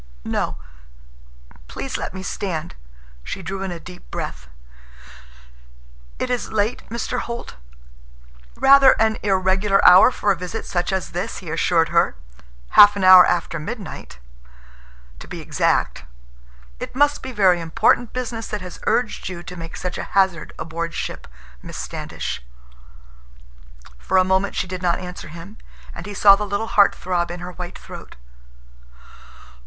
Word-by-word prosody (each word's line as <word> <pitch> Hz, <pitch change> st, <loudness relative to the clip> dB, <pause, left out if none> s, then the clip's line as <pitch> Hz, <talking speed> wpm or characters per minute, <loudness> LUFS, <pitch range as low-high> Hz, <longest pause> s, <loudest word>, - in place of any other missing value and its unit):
"No. -, -, -2 dB, 1.1 s
Please -, -, -6 dB
let -, -, -3 dB
me 190 Hz, 0 st, -8 dB
stand." 175 Hz, -, -4 dB, 0.5 s
She 190 Hz, -, -6 dB
drew 190 Hz, +3 st, -5 dB
in 195 Hz, -, -3 dB
a 170 Hz, -, -6 dB
deep 180 Hz, +1 st, -13 dB
breath. 65 Hz, 0 st, -6 dB, 1.7 s
"It 250 Hz, -, -3 dB
is 245 Hz, -, -2 dB
late, 220 Hz, +2 st, 0 dB
Mr. 235 Hz, +2 st, -3 dB
Holt?" 235 Hz, -, -6 dB, 1.0 s
"Rather 275 Hz, 0 st, +7 dB
an 220 Hz, 0 st, +2 dB
irregular 195 Hz, 0 st, +2 dB
hour 185 Hz, +6 st, +9 dB
for 205 Hz, -5 st, 0 dB
a -, -, +2 dB
visit 180 Hz, +5 st, -6 dB
such 175 Hz, -1 st, -2 dB
as 190 Hz, -2 st, -2 dB
this," 175 Hz, -, -4 dB
he 170 Hz, -5 st, -7 dB
assured 165 Hz, 0 st, +2 dB
her. 170 Hz, -, +2 dB, 0.5 s
"Half 205 Hz, -, +8 dB
an 200 Hz, -, -2 dB
hour 185 Hz, -1 st, +9 dB
after 170 Hz, -1 st, -1 dB
midnight, 210 Hz, +6 st, -7 dB, 1.0 s
to -, -, -11 dB
be -, -, -7 dB
exact. -, -, 0 dB, 0.8 s
It -, -, -7 dB
must 290 Hz, +2 st, +2 dB
be 260 Hz, -, -6 dB
very 190 Hz, -6 st, +3 dB
important 225 Hz, +7 st, +2 dB
business 240 Hz, -3 st, -4 dB
that 210 Hz, -2 st, -4 dB
has 180 Hz, -1 st, -9 dB
urged 240 Hz, -5 st, 0 dB
you 175 Hz, -2 st, -7 dB
to 180 Hz, -, -9 dB
make 165 Hz, -1 st, -8 dB
such 180 Hz, -, -4 dB
a -, -, -3 dB
hazard 190 Hz, -4 st, +2 dB
aboard 165 Hz, +1 st, -5 dB
ship, -, -, -5 dB, 0.3 s
Miss -, -, -9 dB
Standish." -, -, -5 dB, 1.6 s
For 190 Hz, -, 0 dB
a 185 Hz, -, +6 dB
moment 190 Hz, +1 st, 0 dB
she -, -, -1 dB
did 185 Hz, 0 st, -6 dB
not 175 Hz, -2 st, +1 dB
answer 180 Hz, -1 st, -8 dB
him, 170 Hz, +7 st, -11 dB, 0.3 s
and 170 Hz, +3 st, -8 dB
he 205 Hz, -, -7 dB
saw 200 Hz, 0 st, +7 dB
the 205 Hz, -, -3 dB
little 200 Hz, +3 st, -2 dB
heart 200 Hz, -1 st, +5 dB
throb 175 Hz, -2 st, -2 dB
in 175 Hz, 0 st, -6 dB
her 180 Hz, +1 st, -6 dB
white 180 Hz, 0 st, -8 dB
throat. -, -, -11 dB
190 Hz, 150 wpm, -21 LUFS, 175-210 Hz, 1.7 s, hour